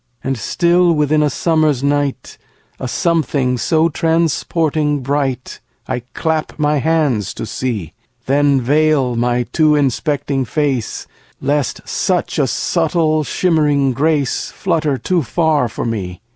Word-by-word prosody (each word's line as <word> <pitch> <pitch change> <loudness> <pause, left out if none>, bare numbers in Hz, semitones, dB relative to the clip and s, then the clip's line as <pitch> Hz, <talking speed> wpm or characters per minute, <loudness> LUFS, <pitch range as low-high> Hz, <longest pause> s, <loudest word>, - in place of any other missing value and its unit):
And 135 0 -1
still 175 +8 +2
within 150 0 +2
a 150 - +2
summer's 155 -5 +1
night 145 -1 -1 0.4
A - - -4
something 135 -4 0
so 160 +5 +2
transporting 160 -2 0
bright, 135 -2 -2 0.3
I - - -2 0.2
clap 160 -1 -2
my 150 -1 +1
hands 145 - 0
to - - -5
see; 110 -9 -4 0.3
Then 140 0 +3
veil 145 -1 +2
my 120 +1 +1
too 155 +3 +2
inspecting 140 0 0
face, 135 -3 -2 0.3
Lest 145 -2 -2
such - - -1
a - - +2
subtle, 155 -3 +1
shimmering 150 -5 +1
grace 145 0 0
Flutter 150 -4 -1
too 175 +8 0
far 150 -2 +1
for - - -5
me. 95 -6 -4
145 Hz, 125 wpm, -17 LUFS, 130-155 Hz, 0.4 s, Then